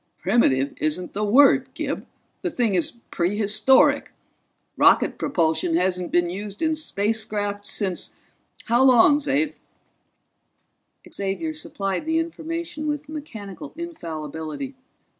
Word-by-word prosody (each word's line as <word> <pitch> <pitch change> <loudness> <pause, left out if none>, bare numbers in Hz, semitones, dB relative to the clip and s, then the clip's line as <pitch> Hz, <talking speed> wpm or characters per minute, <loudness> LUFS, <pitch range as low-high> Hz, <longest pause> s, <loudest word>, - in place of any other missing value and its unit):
"Primitive 140 - +2
isn't 155 +4 -2
the 210 - -2
word, 260 +7 +5
Gib - - -4 0.3
the 360 - -1
thing 240 - 0
is 175 -3 0 0.2
prehistoric! 210 +7 +3 0.6
Rocket - - +4
propulsion 165 - +1
hasn't 180 0 0
been 175 0 +3
used 200 - -5
in 320 0 +2
spacecraft 205 -6 -1
since 190 -4 -2 0.5
how 240 +2 +3
long, 265 +3 +6
Xav?" 290 +1 +1 1.6
Xavier 200 +12 -2
supplied 200 -5 -3
the 320 0 +1
information 325 -1 -4
with 295 0 -3
mechanical 280 -5 -8
infallibility. 165 - -6
215 Hz, 105 wpm, -23 LUFS, 180-295 Hz, 1.6 s, long